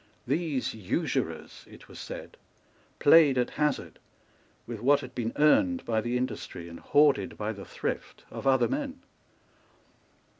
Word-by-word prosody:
These 145 -1 -1
usurers, 105 -5 -3
it - - -15
was - - -12
said, - - -8 0.6
played 145 -3 +6
at 125 - +1
hazard 150 -1 -1 0.7
with 120 -3 -6
what 140 +5 +3
had 130 -1 -9
been 115 -2 -2
earned 260 - +3
by 110 -1 0
the 120 +2 -1
industry 110 -8 -5
and 85 0 -10
hoarded 145 -1 +3
by 105 +1 -2
the 100 -2 -10
thrift - - -5
of - - -5
other 130 -2 +4
men. 275 -2 -4
130 Hz, 140 wpm, -28 LUFS, 115-150 Hz, 0.7 s, played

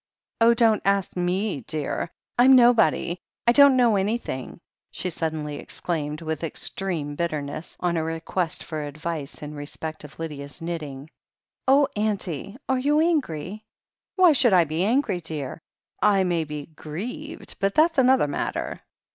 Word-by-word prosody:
"Oh, 230 +1 +6
don't 225 -2 +4
ask 195 -1 +1
me, 180 -2 -1
dear. 155 +2 -2 0.3
I'm 260 +2 +8
nobody. 235 -7 +4 0.2
/ - - -69
don't 280 -1 +7
know 240 -4 +4
anything," 195 - -3 0.3
she 180 - -3
suddenly 155 -3 -3
exclaimed 155 -1 -4
with 160 0 -3
extreme 165 -2 -2
bit 170 +3 -1
terness, 150 +1 -5
on 175 -1 +1
a 160 - 0
request 165 +1 -2
for 155 -2 -4
advice 150 0 -5
in 150 0 -6
respect 155 +2 -7
of 150 0 -12
Lydia's 145 -3 -6
knitting. 155 -5 -5 0.6
"Oh, 275 +1 +5
auntie! 200 - -2
are 260 -1 +1
you 290 +3 +2
angry 215 - 0 0.3
?" - - -69
"Why 365 -3 +7
should 260 -7 +4
I 180 -2 +6
be 160 +2 -1
angry, 220 -3 +1
dear? 155 -2 -5 0.4
I 195 -2 +4
may 170 -3 0
be 150 -1 -6
grieved, 215 - -7
but 195 0 0
that's 320 -1 +4
another 260 - +5
matter." 145 - -3
175 Hz, 150 wpm, -25 LUFS, 155-230 Hz, 0.6 s, I'm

